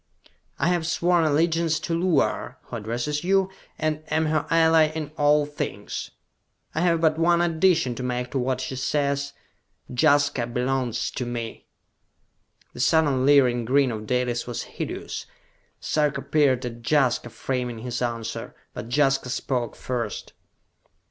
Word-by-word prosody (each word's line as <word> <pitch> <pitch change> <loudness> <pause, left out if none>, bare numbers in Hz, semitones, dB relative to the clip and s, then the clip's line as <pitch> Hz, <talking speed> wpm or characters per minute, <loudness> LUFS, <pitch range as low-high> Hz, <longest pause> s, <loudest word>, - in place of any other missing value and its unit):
"I - - +1
have 175 -3 0
sworn 175 0 +2
allegiance 160 +1 +2
to 170 - -3
Luar, 170 -3 +1
who - - -6
addresses 120 +8 -3
you, 190 +1 +2 0.3
and 155 -1 -1
am 160 0 +1
her 155 -1 0
ally 160 -1 +5
in 155 -1 -5
all 145 0 +3
things! 125 -9 -5 0.6
I 160 - -1
have 170 -2 +2
but 160 -1 +2
one 170 +1 +4
addition 170 -5 +2
to 120 - -7
make 125 0 -2
to 135 - -1
what 130 0 -1
she 130 +1 -4
says: 140 +1 -1 0.6
Jaska 145 -3 +3
belongs 125 -1 -1
to 125 - -4
me!" 115 -2 -5 1.1
The - - -10
sudden 140 -2 +3
leering 125 -4 +5
grin 130 +2 +3
of 110 -1 -6
Dalis 125 0 0
was 120 - -4
hideous. - - -6 0.5
Sarka 150 -1 0
peered 135 -5 +2
at 120 -1 -6
Jaska, 130 -5 +2
framing 125 -1 -3
his 120 +1 -4
answer. 115 -2 -4 0.2
But 115 - -7
Jaska 135 -1 +2
spoke 125 -1 -2
first. 120 -5 -4
140 Hz, 140 wpm, -25 LUFS, 125-160 Hz, 1.1 s, ally